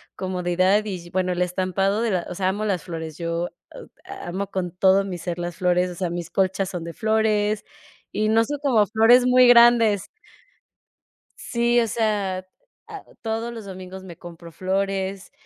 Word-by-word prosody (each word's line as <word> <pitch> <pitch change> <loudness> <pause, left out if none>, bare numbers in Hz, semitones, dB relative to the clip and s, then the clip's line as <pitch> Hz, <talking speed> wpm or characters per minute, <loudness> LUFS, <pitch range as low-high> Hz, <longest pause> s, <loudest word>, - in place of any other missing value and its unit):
comodidad 185 +2 +1
y, 180 -4 -6
bueno, 185 0 0
el 180 - -2
estampado 185 +3 0
de 225 - 0
la 180 -2 -1
o 180 - -6
sea, 185 0 0
amo 210 +3 -2
las 190 -6 -1
flores. 160 -3 -7
Yo 170 0 -2 0.3
o - - -10 0.2
a - - -9
amo 195 +2 -3
con 180 -2 -3
todo 190 +1 +3
mi 180 -2 -5
ser 175 0 -5
las 175 -1 -5
flores, 180 0 +1
o - - -9
sea, 180 -2 -2
mis 175 -1 -5
colchas 190 0 0
son 175 -3 -5
de 170 - -7
flores, 215 -1 0 0.5
y 215 +1 0
no 225 +1 +4
son 290 +2 -4
como 230 -7 +4
flores 230 +4 +5
muy 250 0 +6
grandes. 235 -4 +5 1.3
Sí, 240 0 +1
o 230 - +1
sea, 205 -4 -1 0.4
ah, 420 -3 -9 0.2
todos 225 +1 -3
los 225 -3 -8
domingos 190 0 -9
me 170 -3 -10
compro 170 -1 -11
flores, 195 +1 -2
190 Hz, 180 wpm, -23 LUFS, 180-220 Hz, 1.3 s, muy